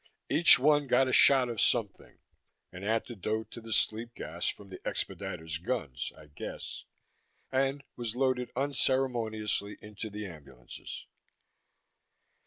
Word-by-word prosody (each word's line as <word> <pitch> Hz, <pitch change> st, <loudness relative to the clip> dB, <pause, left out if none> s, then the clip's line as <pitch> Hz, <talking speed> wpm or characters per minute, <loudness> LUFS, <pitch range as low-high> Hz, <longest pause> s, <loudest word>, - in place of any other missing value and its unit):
Each 170 Hz, -, +8 dB
one 145 Hz, +2 st, +3 dB
got 125 Hz, +1 st, +4 dB
a 130 Hz, -, -1 dB
shot 135 Hz, -2 st, +6 dB
of 115 Hz, -3 st, -2 dB
something 110 Hz, -5 st, 0 dB, 0.5 s
an 90 Hz, -, -9 dB
antidote 110 Hz, 0 st, -2 dB
to 115 Hz, -, -8 dB
the 115 Hz, 0 st, -9 dB
sleep 115 Hz, +2 st, +1 dB
gas 85 Hz, +3 st, -4 dB
from 100 Hz, -1 st, -4 dB
the 95 Hz, -, -9 dB
expediters' 80 Hz, 0 st, -4 dB
guns, 95 Hz, -, -2 dB
I 75 Hz, -, -13 dB
guessed 75 Hz, 0 st, -7 dB, 0.7 s
and 135 Hz, +1 st, +1 dB
was 120 Hz, -2 st, -3 dB
loaded 130 Hz, -1 st, +1 dB
unceremoniously 120 Hz, -6 st, 0 dB
into 105 Hz, +1 st, -7 dB
the 105 Hz, 0 st, -6 dB
ambulances. 70 Hz, -8 st, -10 dB
115 Hz, 125 wpm, -30 LUFS, 100-130 Hz, 0.7 s, Each